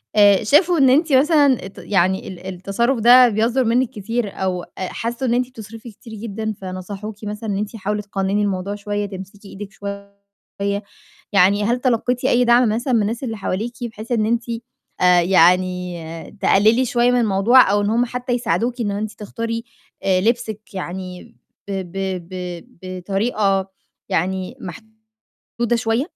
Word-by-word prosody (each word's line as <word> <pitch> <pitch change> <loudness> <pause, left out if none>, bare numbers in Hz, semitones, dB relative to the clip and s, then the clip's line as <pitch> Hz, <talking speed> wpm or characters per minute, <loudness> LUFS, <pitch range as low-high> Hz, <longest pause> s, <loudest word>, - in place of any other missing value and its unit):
آآ 205 -1 +6
شافوا 335 - +4
إن 270 -2 +5
أنتِ 300 +2 +3
مثلًا 280 - +4
ت 195 - -16
يعني 190 -1 0
ال 185 0 -9
التصرُف 225 +7 -1
ده 245 +2 +7
بيصدُر 230 +5 +1
منِك 245 +2 +2
كتير 220 +1 -3
أو 180 -2 -1
أ - - -13
حسوا 235 +7 -3
إن 235 - +2
أنتِ 250 +1 0
بتصرفي 225 -1 -10
كتير 220 +2 -13
جدًا 220 0 -4
فنصحوكِ 195 +3 -6
مثلًا 210 +1 -5
إن 195 - -1
أنتِ 210 +2 -4
"حاولي 210 0 -2
تقنّني 200 0 -1
الموضوع 200 0 -2
شوية، 205 0 -3
تمسكي 200 +1 -10
إيدِك 200 +1 -8
شوية."، 200 -1 -8 1.2
يعني 200 +2 +4
هل 240 +3 +1
تلقيتِ 250 0 0
أي 250 -1 +4
دعم 240 -1 +5
مثلًا 240 +4 -1
من 225 - +4
الناس 230 +5 -2
اللي 225 -3 -3
حواليكِ 215 +5 -3
بحيث 225 0 -7
إن 220 -3 +2
أنتِ 235 +1 0 0.6
آآ 180 -1 +6
يعني 180 -1 +1
تقللي 220 +6 +4
شوية 245 -1 +2
من 250 - +3
الموضوع 215 +2 +5
أو 205 0 +2
إن 205 - 0
هُم 240 +2 +2
حتى 250 +1 -3
يساعدوكِ 240 0 -1
إن 205 -2 -1
أنتِ 210 +1 -3
تختاري 230 +2 -5 0.4
آآ 185 -1 +2
لبسِك 220 -2 -2
يعني 180 -5 -7 0.3
ب - - -5 0.2
ب 190 -2 -4
ب 180 0 -6 0.2
بطريقة 195 +1 -1 0.4
يعني 185 +1 -1
محدودة 220 +3 -11 0.7
شوية؟ 230 +4 0
210 Hz, 160 wpm, -20 LUFS, 190-235 Hz, 1.2 s, ده